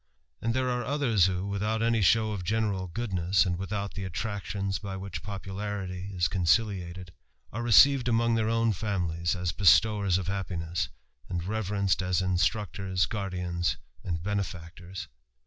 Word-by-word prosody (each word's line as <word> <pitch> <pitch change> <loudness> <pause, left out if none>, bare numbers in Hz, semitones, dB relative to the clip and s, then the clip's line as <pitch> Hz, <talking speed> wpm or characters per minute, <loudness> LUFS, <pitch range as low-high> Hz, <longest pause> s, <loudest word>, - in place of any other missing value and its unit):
And 115 +1 0
there 130 -1 +1
are 125 0 -1
others 125 - +2
who, 95 0 -2
without 105 +3 -1
any 115 -1 +2
show 110 +3 +4
of 100 -4 -4
general 100 -1 0
goodness, 95 -1 +1
and 90 -1 0
without 100 +2 -3
the 100 - -5
attractions 100 +1 -3
by 100 -2 -5
which 95 -5 -6
popularity 95 -1 -5
is 85 -2 +2
conciliated, 90 0 0 0.4
ar« 115 - -3
received 125 +2 +6
among 115 0 +2
their 110 -1 +1
own 115 -1 +2
families 85 -4 -1
as 90 -2 -1
bestowers 100 +2 +4
of 95 - -3
liappiness, 90 -3 -2 0.4
and 90 -2 -2
reverenced 100 -1 0
as 90 -1 +1
instmctors, 95 0 0
guardians, 90 -4 -2 0.3
and 85 -3 -3
benefactors. 90 -2 -4
95 Hz, 145 wpm, -28 LUFS, 90-110 Hz, 0.4 s, received